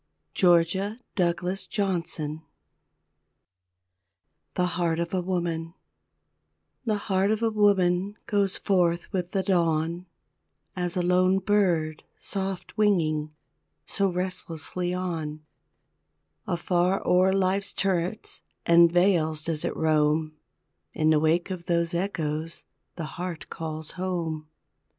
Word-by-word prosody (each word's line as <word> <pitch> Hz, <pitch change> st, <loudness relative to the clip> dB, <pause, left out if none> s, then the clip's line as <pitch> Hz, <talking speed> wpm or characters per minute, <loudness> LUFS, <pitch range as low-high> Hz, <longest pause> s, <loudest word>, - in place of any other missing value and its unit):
Georgia 185 Hz, +4 st, +3 dB, 0.2 s
Douglas 180 Hz, +1 st, 0 dB
Johnson 170 Hz, -6 st, -2 dB, 2.1 s
THE 180 Hz, -, +2 dB
HEART 170 Hz, -2 st, 0 dB
OF 170 Hz, +1 st, -2 dB
A 185 Hz, -, +1 dB
WOMAN 170 Hz, -2 st, -2 dB, 1.1 s
The 215 Hz, -3 st, +1 dB
heart 195 Hz, 0 st, +2 dB
of 220 Hz, +1 st, 0 dB
a 225 Hz, -, +2 dB
woman 200 Hz, -2 st, +2 dB
goes 200 Hz, -2 st, +1 dB
forth 175 Hz, -1 st, +1 dB
with 180 Hz, -2 st, -1 dB
the 190 Hz, 0 st, -1 dB
dawn, 170 Hz, -1 st, +1 dB, 0.7 s
As 180 Hz, -1 st, -2 dB
a 180 Hz, -, +1 dB
lone 185 Hz, +1 st, +3 dB
bird, 180 Hz, -6 st, +1 dB, 0.2 s
soft 195 Hz, -2 st, -3 dB
winging, 155 Hz, -7 st, +2 dB, 0.5 s
so 195 Hz, -1 st, +1 dB
restlessly 180 Hz, -1 st, -2 dB
on, 165 Hz, -4 st, -3 dB, 1.0 s
Afar 180 Hz, +2 st, +1 dB
o'er 185 Hz, +1 st, +5 dB
life's 195 Hz, +1 st, +1 dB
turrets 190 Hz, +2 st, -1 dB, 0.2 s
and 170 Hz, 0 st, +6 dB
vales 170 Hz, -4 st, +2 dB
does 160 Hz, -2 st, -1 dB
it -, -, -2 dB
roam 155 Hz, 0 st, +2 dB, 0.6 s
In 155 Hz, 0 st, +3 dB
the 155 Hz, -, +4 dB
wake 165 Hz, +4 st, +1 dB
of 175 Hz, -2 st, -5 dB
those 170 Hz, -1 st, +1 dB
echoes 165 Hz, -3 st, -2 dB, 0.3 s
the 165 Hz, -, -4 dB, 0.2 s
heart 180 Hz, -3 st, -5 dB
calls 155 Hz, -1 st, -5 dB
home. 170 Hz, -4 st, -3 dB
175 Hz, 110 wpm, -26 LUFS, 165-190 Hz, 2.1 s, and